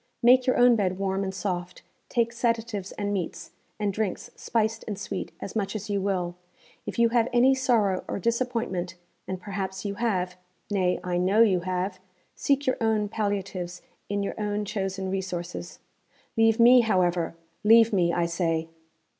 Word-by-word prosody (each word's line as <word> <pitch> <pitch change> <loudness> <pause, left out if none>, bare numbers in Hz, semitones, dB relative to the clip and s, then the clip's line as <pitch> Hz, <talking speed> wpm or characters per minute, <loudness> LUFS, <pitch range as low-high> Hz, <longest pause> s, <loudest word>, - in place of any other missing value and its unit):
Make 255 +2 +6
your 255 - +3
own 245 -1 +6
bed 185 -4 0
warm 195 0 -1
and 190 - -2
soft; 180 -2 -4 0.3
take 235 -1 +1
sedatives 230 -4 -1
and 205 -1 -2
meats, 185 -4 -4 0.3
and 205 -2 0
drinks 210 -2 -3
spiced 225 0 -1
and 210 -3 -3
sweet, 200 -1 -5
as 200 - -7
much 205 -1 -1
as 210 0 -4
you 200 -1 0
will. 185 -3 -1 0.5
If - - -5
you 235 0 +4
have 235 0 +2
any 245 +2 +5
sorrow 230 -8 +2
or - - -3
disappointment 230 -5 -1 0.3
(and 185 -1 -4
perhaps 190 0 -5
you 200 - -1
have 185 -5 -1 0.3
nay, 185 -3 +1
I 180 -1 -1
know 195 +5 +5
you 190 -5 +3
have) 185 +1 -2 0.3
seek 280 0 +1
your 255 - +1
own 220 -2 +1
palliatives 195 -4 -3 0.3
in 200 0 -1
your 200 - -2
own 210 0 -1
chosen 195 -2 -3
resources. 180 -2 -4 0.6
Leave 225 0 +4
me, 245 +2 +8
however. 180 -6 +1 0.3
Leave 225 +1 +6
me, 175 -3 +3
I 170 0 +1
say!' 165 -1 -1
200 Hz, 165 wpm, -26 LUFS, 185-225 Hz, 0.6 s, me